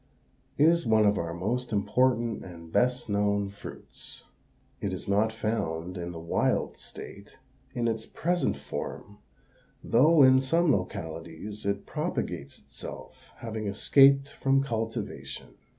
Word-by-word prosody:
_), - - -37 0.5
is 165 +3 +5
one 110 -1 +4
of 105 0 +3
our 85 -1 -3
most 115 +9 -2
important 115 +2 +1
and 85 -2 -11
best 125 +4 +1
known 100 -1 +1
fruits. 100 - -10 0.6
It - - -2
is - - -6
not 105 +3 +2
found 90 -6 -2
in 85 -1 -5
the 85 - -7
wild 85 0 0
state, - - -11 0.4
in 120 -1 0
its 110 -1 -2
present 175 +1 0
form, 100 0 -7 0.6
though 150 +5 +5
in 130 0 +7
some 165 +4 +2
localities 100 - -4
it 100 0 -1
propagates 70 0 -3
itself, - - -11
having 110 -2 -4
escaped 135 +7 +5
from 135 0 +1
cultivation. 115 - -4
110 Hz, 130 wpm, -28 LUFS, 100-130 Hz, 0.6 s, in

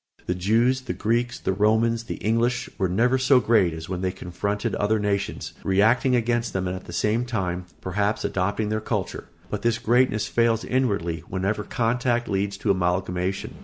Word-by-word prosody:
The 90 - 0
Jews, 115 +8 +2
the 110 - -4
Greeks, 120 +5 0
the - - -1
Romans, 110 +3 +2
the - - -4
English 115 +2 0
were 95 - +1
never 120 +8 +2
so 130 0 +5
great 110 -6 +3
as 80 +1 -7
when 90 -1 -4
they 95 -1 0
confronted 100 +4 -3
other 105 +2 +1
nations, 100 -1 -2
reacting 115 +7 +3
against 120 0 0
them 95 -1 -1
and 90 - -2
at 95 - -8
the - - -9
same 105 +7 +1
time, 90 -7 -3
perhaps, 100 +3 -1
adopting 100 +3 -1
their 110 0 -1
culture; - - -3 0.3
but - - -2
this 115 -1 +1
greatness 120 -2 +2
fails 115 -1 +1
inwardly 100 -11 0
whenever 100 +3 -1
contact 120 +2 0
leads 100 0 -1
to 100 - +1
amalgamation. 90 +1 -1
105 Hz, 175 wpm, -24 LUFS, 95-120 Hz, 0.3 s, so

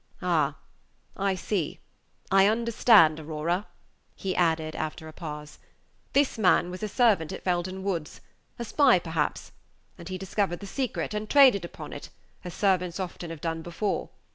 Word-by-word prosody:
"Ah! - - +1 0.6
I 195 -1 0
see 185 -3 -2 0.5
I 195 0 +6
understand, 220 -7 +5
Aurora," 160 +5 -2 0.5
he 190 -1 -3
added, 160 -2 +1
after 160 +1 -4
a 155 - -10
pause. 150 -2 -8 0.5
"This 275 -4 +2
man 180 -3 +3
was 185 - -7
a 215 - -1
servant 205 - +2
at 190 - -7
Felden 185 +1 -1
Woods; 175 -6 -3 0.4
a 235 - -4
spy, 265 0 +5
perhaps; 160 -3 -2 0.5
and 170 +1 -9
he 185 - -3
discovered 190 -1 -1
the 200 - -8
secret, 250 +2 -3
and 210 0 -4
traded 260 -10 +6
upon 170 - -8
it, - - -8 0.3
as 175 -2 -7
servants 180 -3 +1
often 175 -2 -5
have 165 -2 -8
done 165 -1 -2
before. 175 +5 -3
185 Hz, 155 wpm, -27 LUFS, 165-205 Hz, 0.6 s, I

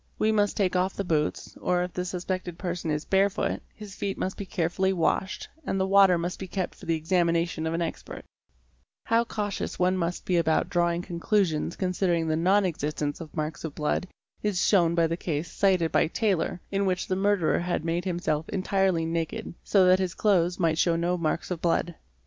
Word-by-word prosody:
We 220 - +2
must 205 -2 +1
take 185 -3 +1
off 185 +1 +1
the 200 - -2
boots, 155 -4 -1
or 180 0 +1
if 180 - -5
the 180 - -3
suspected 180 -1 -4
person 175 -3 -3
is 150 0 -1
barefoot, 195 0 +1
his 210 -2 -10
feet 195 0 -3
must 190 - -2
be 200 - -7
carefully 190 +1 0
washed, 190 +2 0 0.2
and 195 - -1
the 190 - +2
water 195 -2 +6
must 175 +2 -3
be 190 - -5
kept 185 0 -3
for - - -14
the 165 -1 +1
examina 170 0 +2
tion 160 -1 -4
of 160 - -1
an 170 - -1
expert®®, 165 - -5 0.8
How 230 +1 +3
cautious 210 -3 -3
one 180 +1 +2
must 175 -1 -2
be 180 - +1
about 160 -2 +1
drawing 175 -1 +1
conclusions 170 -2 0
concerning 180 -3 0
the 155 - +1
non 190 +5 +3
existence 150 -2 -2
of 160 - -10
marks 155 +1 -3
of 160 -3 -5
blood 150 +4 -1 0.3
is 205 -4 0
shewn 170 -5 +3
by 170 -1 +4
the 165 +1 -1
case 160 -1 -3
cited 185 -5 +2
by - - +3
Taylor 180 -2 0
in 195 0 +1
which 185 -1 0
the 185 - -1
murderer 195 -3 +2
had 175 -2 -2
made 170 +2 -1
himself 170 -4 -1
entirely 190 -3 +1
naked, 165 -1 -3
so 195 -3 +4
that 185 +1 +5
his 185 -1 -2
clothes 180 -4 +2
might 165 -2 +1
show 170 -2 +3
no 170 +2 0
marks 170 +1 -2
of 170 -2 -3
blood. 170 0 +1
180 Hz, 200 wpm, -27 LUFS, 165-190 Hz, 0.8 s, water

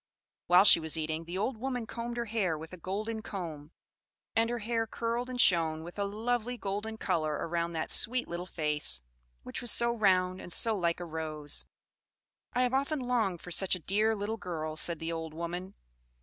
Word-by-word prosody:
While 180 +2 +7
she 170 - +9
was 160 0 +1
eating, 160 +1 -3
the 175 +2 -5
old 225 +5 -1
woman 250 0 -3
combed 235 +2 -5
her 235 - -1
hair 205 -8 0
with 160 +3 -9
a - - -7
golden 215 +6 -3
comb, 165 -8 -6 0.6
and 225 +1 +3
her 240 - -1
hair 225 0 -1
curled 235 +3 -2
and 250 -1 -5
shone 160 -7 +4
with 175 +4 -9
a 200 - +1
lovely 240 +4 -2
golden 210 +2 -4
color 160 -7 0
around 170 +2 -2
that 160 - -3
sweet 250 +1 +2
little 175 +1 -5
face, 150 - +2 0.4
which - - -6
was 240 - +1
so 235 +1 +5
round 185 -4 +2
and - - -9
so 225 +5 +5
like 170 -3 0
a 175 - -5
rose. 155 -2 -4 0.9
"I 250 - +2
have 250 0 0
often 280 +3 +1
longed 235 -9 0
for 180 - -9
such 190 +2 +3
a - - -7
dear 210 +6 +1
little 210 +2 -3
girl," 160 -5 -4
said 170 +1 0
the 165 +1 -4
old 160 -1 -5
woman. 175 +3 -5
190 Hz, 195 wpm, -31 LUFS, 165-230 Hz, 0.9 s, she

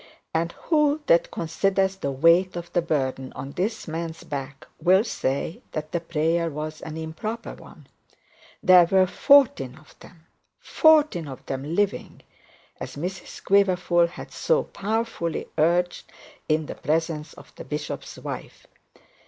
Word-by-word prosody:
And 165 +1 0
who 300 -2 +2
that 170 -8 +4
considers 190 +3 0
the 140 - -3
weight 165 +7 +4
of 175 0 -7
the 175 - +3
burden 135 -5 -2
on 135 - -7
this 200 +8 -3
man's 165 0 -5
back, 140 -1 -6
will 185 +5 +5
say 140 - -2
that 155 0 -4
the 170 - 0
prayer 165 0 0
was 155 +1 -6
an 155 0 -7
improper 160 +9 -5
one? - - -15 0.8
There 180 -1 +8
were 190 +2 +4
fourteen 185 - +4
of 155 -1 -18
them 165 -2 -17 0.3
fourteen 300 - +3
of 130 -2 -9
them 140 +5 -4
living 205 0 -1 0.6
as - - -7
Mrs 180 +5 -6
Quiverful 180 -3 +3
had 170 - -10
so 485 0 +1
powerfully 215 -5 -3
urged 175 +3 +1 0.4
in 155 0 +2
the - - -6
presence 160 0 -2
of - - -16
the - - -8
bishop's 150 0 -5
wife. - - -8
170 Hz, 140 wpm, -25 LUFS, 155-190 Hz, 0.8 s, There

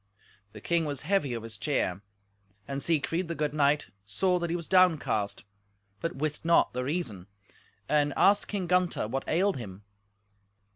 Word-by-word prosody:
The - - -10
king 170 -1 +1
was 145 -3 -3
heavy 160 -11 +1
of 115 - -5
his 110 -2 -6
cheer, 100 -6 -1 0.7
and 140 0 -4
Siegfried, 165 +3 0
the 170 - -4
good 150 -2 -1
knight, 145 0 +2
saw 180 - +1
that 170 -1 -2
he 170 - -1
was 170 -2 -5
downcast, 160 - +2 0.6
but 165 +1 -3
wist 150 +1 -2
not 170 +1 +3
the 125 +1 -2
reason, 125 - -3 0.6
and 145 -1 +2
asked 200 +1 +4
King 200 -3 -2
Gunther 180 -10 +1
what 135 +3 -3
ailed 190 +1 +2
him. 100 -4 -8
150 Hz, 160 wpm, -28 LUFS, 125-175 Hz, 0.7 s, asked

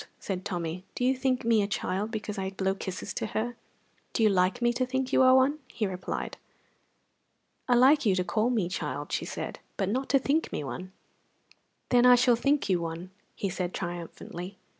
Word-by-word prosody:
said 190 -2 -4
Tommy. 175 -1 -3
"Do 250 - 0
you 260 +1 +3
think 255 -2 0
me 230 -2 +4
a 200 - 0
child 200 +1 -2
because 210 -2 -4
I 190 0 -2
blow 190 0 -1
kisses 190 -1 -5
to - - -3
her?" 240 +2 -1 0.6
"Do 230 - +1
you 215 - +6
like 185 +4 +2
me 240 0 +2
to 255 - 0
think 260 +1 -2
you - - +5
one?" 260 +3 +5
he 220 - -2
replied. 185 -2 -4 1.3
"I 245 - +4
like 275 +5 +6
you 200 -5 +3
to 180 - +1
call 215 +7 +1
me 220 -8 +1
child," 145 -5 -4
she - - -1
said, - - -5 0.2
"but 195 -2 0
not 260 +5 -1
to 275 - +5
think 285 +4 0
me - - -3
one." 185 +7 -6 1.0
"Then 245 0 +5
I 250 - +9
shall 245 0 +4
think 280 +5 +1
you 180 -3 +2
one," 170 +2 -5 0.4
said 180 -1 -2
he, - - -21
triumphantly. 175 +1 -6
210 Hz, 195 wpm, -28 LUFS, 185-250 Hz, 1.3 s, I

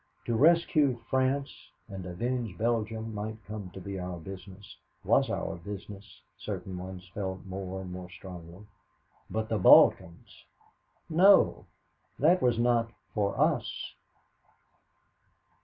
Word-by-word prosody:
To 115 - 0
rescue 150 -2 +4
France 130 +2 +1 0.3
and 95 -3 -7
avenge 115 +3 -3
Belgium 110 -1 -1
might 105 +1 -4
come 105 -2 -7
to - - -6
be 95 +1 -6
our 90 -1 -5
business 95 +3 -10 0.3
was - - +3
our - - -3
business, 100 +2 -10 0.2
certain 95 - -5
ones 95 0 -8
felt 95 -2 -4
more 95 0 -5
and 90 -1 -8
more 90 0 -7
strongly. 90 0 -11 0.6
But 110 0 -2
the 110 -2 -1
Balkans? 85 -2 +5 0.6
No, 190 +5 +5 0.5
that 170 +7 +4
was 120 -2 +2
not 120 -1 +2 0.2
for 100 -2 -1
us. - - 0
105 Hz, 120 wpm, -29 LUFS, 95-120 Hz, 0.6 s, Balkans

